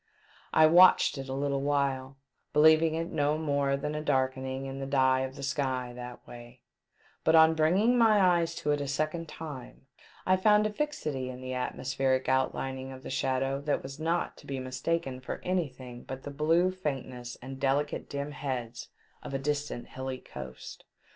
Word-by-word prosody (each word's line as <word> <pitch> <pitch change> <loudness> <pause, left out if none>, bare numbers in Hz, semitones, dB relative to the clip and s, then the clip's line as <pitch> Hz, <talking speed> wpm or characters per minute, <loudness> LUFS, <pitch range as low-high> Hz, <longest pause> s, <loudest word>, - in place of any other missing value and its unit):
I 155 - +6
watched 175 -3 +6
it 135 0 -6
a - - -3
little 140 0 -1
while, 140 -2 -1 0.4
believing 160 +1 +5
it 165 +1 -3
no 150 0 +1
more 140 -3 0
than 150 +2 -3
a 150 - -3
darkening 130 -2 -1
in 135 0 -6
the 135 - -4
dye 130 -1 +3
of 130 0 -3
the 140 - -8
sky 130 -3 -2
that 125 0 -9
way; 120 +1 -12 0.6
but 160 - +4
on 160 0 +7
bringing 190 +10 +3
my 220 -2 +5
eyes 170 -3 +3
to 150 - -1
it 145 0 0
a 140 - -3
second 155 +4 -2
time, 145 -5 -9 0.4
I 185 - +4
found 210 +2 +4
a 215 - -1
fixity 155 - -3
in 125 0 -7
the 130 0 -5
atmospheric 130 +1 -1
outlining 130 0 -1
of 130 0 -10
the - - -6
shadow 135 +1 0
that 145 0 -1
was 135 +2 -8
not 165 +2 -1
to - - -15
be 135 - -3
mistaken 130 +2 -2
for 130 - -5
anything 130 -9 -3
but 130 0 -7
the 145 - -6
blue 165 +5 +2
faintness 130 -8 -5
and 135 +1 -8
delicate 140 +2 0
dim 140 +1 -4
heads 130 -5 -5 0.3
of 135 - -6
a - - +2
distant 145 -2 -3
hilly 130 0 -5
coast. 65 - -10
140 Hz, 180 wpm, -29 LUFS, 130-155 Hz, 0.6 s, on